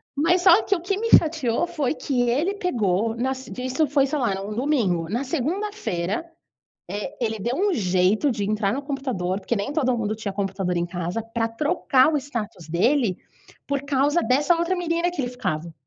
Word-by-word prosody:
Mas 340 +5 +3
só 370 +2 +7
que, 400 - +1
o 340 - -5
que 380 +3 -1
me 455 +2 -2
fatiou 310 -4 +4
foi 305 -7 -1
que 250 -5 0
ele 315 +12 +1
pegou, 225 - 0
nas 260 +2 -2
de 250 - -7
isso 265 +4 +1
foi, 280 0 +3
sei 295 +2 -2
lá, 240 -6 +1
era 195 0 -3
um 210 - -5
domingo, 215 - 0
na 235 +7 -1
segunda-feira, 325 - -2 0.7
eh, 210 +9 -5
ele 220 -2 -1
deu 235 +6 -2
um 405 +3 +2
jeito 190 - +2
de 220 -5 -2
entrar 210 -1 0
no 275 +4 -3
computador, 255 -10 -2
porque 235 +4 -1
nem 200 +7 -2
todo 260 -5 +1
mundo 215 -2 -1
tinha 215 -2 -5
computador 195 -2 -2
em 170 0 0
casa, 175 +4 -3
pra 225 0 -2
trocar 265 +3 +2
o - - +2
status 225 - -6
dele, 215 - +2 0.5
por 280 -1 -1
causa 285 +4 +2
dessa 290 +7 +3
outra 340 +2 0
menina 340 0 0
que 350 - -4
ele 245 -2 -2
ficava. 170 -9 -3
255 Hz, 195 wpm, -24 LUFS, 205-300 Hz, 0.7 s, só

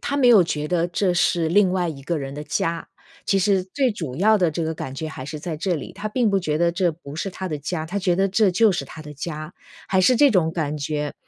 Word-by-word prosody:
他 280 - -2
没 265 - +3
有 220 -6 +7
觉 150 -3 -2
得 170 0 +1
这 180 +1 0
是 170 -2 +2
另 190 +2 +4
外 180 -2 0
一 140 -4 -7
个 165 +3 -2
人 135 0 -6
的 150 - -6
家。 165 +3 -2 0.4
其 195 - +2
实 195 -1 +2
最 245 +6 0
主 155 -10 -6
要 215 +4 +4
的 180 -4 +2
这 165 +2 -3
个 160 0 -2
感 130 - -6
觉 155 +3 -4
还 140 -4 -8
是 150 +2 -6
在 155 +1 -5
这 180 +3 -1
里， 155 +4 -7
他 205 +3 -5
并 230 +1 +1
不 200 -1 +2
觉 155 -4 -1
得 170 0 +2
这 175 0 +1
不 155 -3 -11
是 190 +5 -3
他 190 +1 -6
的 155 -4 -3
家。 155 +2 -4
他 180 - -5
觉 180 -3 +1
得 195 - +3
这 200 +1 +3
就 210 +3 +4
是 175 - -3
他 160 - -11
的 150 -1 -10
家， 155 +1 -6 0.3
还 190 - +2
是 245 +6 +4
这 285 +1 +6
种 170 -5 +2
感 155 -3 -2
觉。 150 0 -3
175 Hz, 295 characters per minute, -22 LUFS, 155-195 Hz, 0.4 s, 有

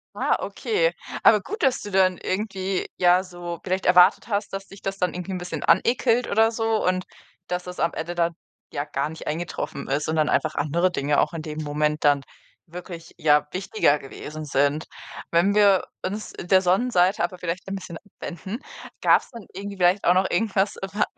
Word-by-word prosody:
Ah, - - +1
okay. - - 0 0.3
Aber 210 -2 +6
gut, 425 - -6
dass 270 -3 +2
du 205 - -7
dann 185 -1 +3
irgendwie, 190 -1 -2
ja, 180 +1 +4
so 175 -2 -7
vielleicht 185 0 -2
erwartet 180 +2 +5
hast, 205 -2 -2
dass 195 0 -5
dich 195 - -14
das 195 0 -3
dann 180 -1 0
irgendwie 180 +2 -5
'n - - -2
bisschen 175 0 -5
anekelt 235 +4 +3
oder 225 +2 +4
so 225 -1 0
und 185 0 +1 0.4
dass 180 0 -2
das 180 0 -8
am 165 +1 +1
Ende 170 +2 -4
dann 170 -1 +1 0.4
ja 145 - -1
gar 145 0 -2
nicht 160 - -9
eingetroffen 155 -3 -4
ist 145 +3 -1
und 160 - 0
dann 155 -1 +2
einfach 155 -1 +1
andere 170 +5 +1
Dinge 145 -3 +1
auch - - -1
in 165 - -4
dem 155 0 -5
Moment 150 +1 -1
dann 145 -1 +4 0.5
wirklich, 175 -1 -9
ja, 150 -3 +3
wichtiger 185 -5 +1
gewesen 150 +2 -8
sind. 145 +1 +1 0.5
Wenn 185 +5 +3
wir 200 -3 +5 0.2
uns 205 +3 -4
der 185 +1 +3
Sonnenseite 190 0 +2
aber 185 - -2
vielleicht 180 +1 -4
ein 195 - -3
bisschen 185 -3 -7
abwenden, 190 - -8 0.4
gab's - - +4
dann 230 -4 -10
irgendwie 200 +1 -7
vielleicht 180 +2 +3
auch 175 - +5
noch 185 +1 +2
irgendwas 200 0 +1
a 195 +2 -1
180 Hz, 190 wpm, -24 LUFS, 165-195 Hz, 0.5 s, Aber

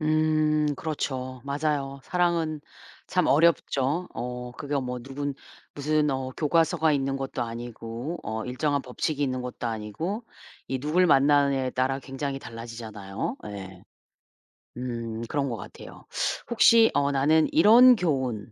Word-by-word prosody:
음. 155 -1 +2
그렇죠. 130 -5 -4
맞아요. 140 -1 -2
사랑은 170 -4 0 0.5
참 - - +2
어렵죠. 155 0 +2
어 125 0 -5
그게 145 +3 -3
뭐 125 -2 -3
누군 140 +3 -4 0.4
무슨 150 +1 +1
어 130 -1 -2
교과서가 160 0 +2
있는 135 -1 0
것도 135 -2 -3
아니고 120 +5 -6
어 110 +1 -4
일정한 140 +3 0
법칙이 140 +4 -3
있는 130 -2 -1
것도 125 -1 -5
아니고 115 - -4 0.5
이 130 - -1
누굴 155 +7 +2
만나느냐에 140 -3 +4
따라 130 +2 0
굉장히 135 +1 -4
달라지잖아요. 115 -3 -6
예. 95 -3 -8 1.0
음 115 -2 -4
그런 140 +1 -1
것 115 - -3
같아요. - - -11 0.5
혹시 230 -1 +6
어 145 0 +2
'나는 150 +3 +3
이런 235 +9 +8
교훈 130 - -1
140 Hz, 270 characters per minute, -26 LUFS, 125-155 Hz, 1.0 s, 이런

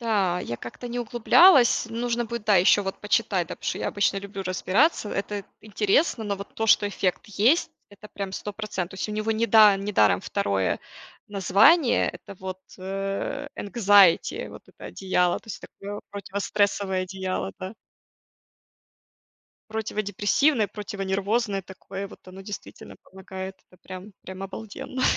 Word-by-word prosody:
Да, 200 -6 +1
я 120 - -5
как-то 120 - -9
не 240 +1 -4
углублялась, 240 +3 +5
нужно 235 +1 -1
будет, 235 -1 -6
да, 210 - +4
еще 190 +3 +5
вот 190 -1 -5
почитать, 210 -5 0
да, - - -5
потому - - -16
что - - -2
я - - -2
обычно 200 0 +1
люблю 195 0 -7
разбираться, 205 - +1
это 200 0 -3 0.2
интересно, 215 - +1
но 200 -1 -2
вот 200 +1 -10
то, 225 - -2
что 205 - +5
эффект 190 -2 -2
есть- 225 - +2 0.2
это 205 +1 -13
прям 195 -1 -5
100 205 +2 -5
процен 205 -4 -4
то 185 - -13
есть 190 - -4
у - - -4
него 215 +1 -2
не 225 +1 0
да 215 -3 +7
не 200 +2 -4
даром 105 - +4
второе 95 -2 -1 0.5
название- 205 - +4
это 200 - -11
вот, 185 0 -6 0.2
э, 195 +9 -4
энкзаити, 200 -4 +4
вот - - -12
это - - -15
одеяло, 180 -2 0
то - - -27
есть - - -6
такое, 205 +1 -8
противострессовое 200 -1 -1
одеяло, 185 0 -4
да. 190 +2 -7 2.0
Противодепрессивное, 215 +4 +1
противонервозное 200 +1 -2
такое 190 +1 -8
вот, - - -16
оно 185 +1 -11
действительно 200 0 -9
помогает, 190 0 -8 0.2
это 180 - -21
прям 185 +2 -9
прям 190 +1 -8
обалденно! 220 +5 -6
200 Hz, 155 wpm, -25 LUFS, 190-220 Hz, 2.0 s, да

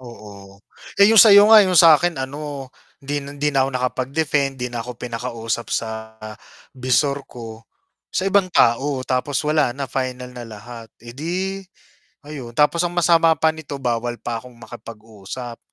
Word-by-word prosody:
Oo. 100 -5 -13 0.4
Eh, 200 - +6
yung 220 - +8
sa'yo 210 0 +7
nga 215 - +10
yung 185 -3 +2
sa 165 0 +8
akin 175 -3 -1
ano, 140 0 -6 0.3
hindi 145 +1 -2
na 140 - -10
hindi 150 +1 0
na 135 - +2
ako - - -2
nakapag-defend, 135 +2 -1
'di 125 -1 -5
na 120 - -4
ako 120 0 -8
pinakausap 115 -1 -5
sa 110 -1 -5 0.6
bisor 135 +2 0
ko. 115 -2 -10 0.4
Sa 185 - -2
ibang 195 -1 +2
tao 130 -1 +2
tapos 130 +2 -1
wala 150 -4 +1
na 140 - -3
final 125 -1 -5
na 120 -1 -9
lahat, 115 +2 -11 0.2
eh, 120 - -9
'di, 185 +7 -4 0.6
ayun 135 -6 -9
tapos 150 +4 +2
ang 175 - -6
masama 165 -2 +4
pa 160 - +2
nito 155 -3 -8
bawal 120 -2 -2
pa 115 -1 -5
akong 125 0 -15
makipag-usap 115 0 -10
130 Hz, 165 wpm, -20 LUFS, 120-150 Hz, 0.6 s, nga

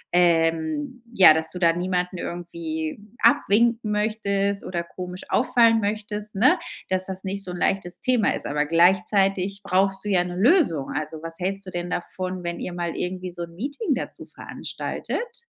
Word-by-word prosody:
ähm, 170 - +2
ja, 190 -7 +8
dass 160 0 -1
du - - -7
da 170 -2 +4
niemanden 180 0 -2
irgendwie 165 -1 -4 0.2
abwinken 230 0 +3
möchtest 200 -2 0
oder 175 -2 -3
komisch 180 +1 -8
auffallen 230 -2 +4
möchtest, 210 0 -3
ne, 260 - +4 0.3
dass 185 0 +1
das 190 0 -5
nicht 195 +1 -3
so 185 - -7
'n 180 - -5
leichtes 175 0 -1
Thema 250 -4 +2
ist. - - -4
Aber 150 +1 0
gleichzeitig 190 +3 +2
brauchst 195 +1 +1
du - - -2
ja 180 -3 +3
'ne 175 0 -6
Lösung. 200 - +3
Also, 155 +2 -4
was 165 - -5
hältst 195 +2 -2
du 185 - -8
denn 175 0 -4
davon, 185 0 -4
wenn 170 0 -3
ihr 180 - -5
mal 175 -1 -3
irgendwie 180 0 -4
so 175 0 -8
'n 170 0 -10
Meeting 285 - -2
dazu - - -6
veranstaltet? 470 0 -6
185 Hz, 170 wpm, -24 LUFS, 175-210 Hz, 0.3 s, ja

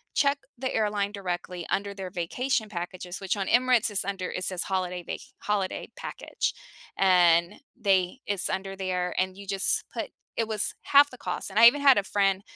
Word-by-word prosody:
check 280 -1 +3 0.2
the 260 +1 -3
airline 210 -2 0
directly 180 -3 -4
under 200 0 -1
their 190 -2 -6
vacation 215 +7 -1
packages, 180 -1 -6
which 195 +2 -1
on 195 - -2
Emirates 245 -1 +4
is 200 - 0
under 195 -2 -3
it 185 - -4
says 185 -2 -2
holiday 180 -2 -2
va - - -4 0.2
holiday 200 -2 -2
package, - - -3 0.4
and 175 -1 +4 0.2
they 190 +2 +2
it's 200 -2 -1
under 195 0 -3
there, 180 -2 -2
and 185 0 -1
you 200 - -9
just 195 0 0
put - - -3 0.3
It 225 -1 0
was 215 -2 -1
half 285 +1 +6
the 255 - -12
cost, - - -4
and 205 +3 0
I 235 - +11
even 285 +4 +4
had 275 -5 +7
a 205 - +2
friend, 195 -1 +1
195 Hz, 185 wpm, -27 LUFS, 185-215 Hz, 0.4 s, I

